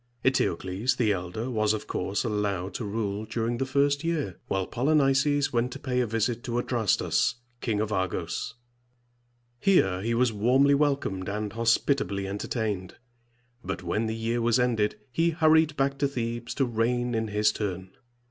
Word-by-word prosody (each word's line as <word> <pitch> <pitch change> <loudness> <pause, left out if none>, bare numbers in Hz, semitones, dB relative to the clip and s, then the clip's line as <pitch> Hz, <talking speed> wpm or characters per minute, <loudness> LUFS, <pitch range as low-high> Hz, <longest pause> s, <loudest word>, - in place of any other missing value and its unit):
Eteocles, 105 -2 +1
the 110 -4 +2
elder, 95 +5 -3
was 110 -2 +2
of 110 - -4
course 95 +2 -2
allowed 100 -4 -1
to 120 - -4
rule 105 -1 -2
during 115 +2 -2
the 135 - -1
first 140 +2 +2
year; 155 - -2
while 95 -1 0
Polynices 140 +2 +2
went 120 +1 +1
to - - -6
pay 125 -2 -2
a 125 - +1
visit 115 +2 -1
to 120 -2 -2
A 120 - +1
dras´tus, 115 0 +1 0.2
King 110 -4 -1
of 110 0 -1
Argos. 95 +3 -2 1.0
Here 95 - +3
he 115 +3 0
was 120 -1 +2
warmly 130 +7 +4
welcomed 140 -10 0
and 105 +1 -3
hospitably 115 -3 +1
entertained; 100 -1 -3 0.7
but 90 0 -4
when 105 +6 -1
the 110 - -2
year 115 +1 -1
was 115 0 +3
ended, 115 -4 +1 0.2
he 165 +5 +2
hurried 160 -2 +3
back 135 0 0
to 140 - +3
Thebes 120 -3 -4
to 135 - +2
reign 120 +1 0
in 110 -1 0
his 105 0 +2
turn. 95 -3 -4
115 Hz, 165 wpm, -27 LUFS, 105-130 Hz, 1.0 s, warmly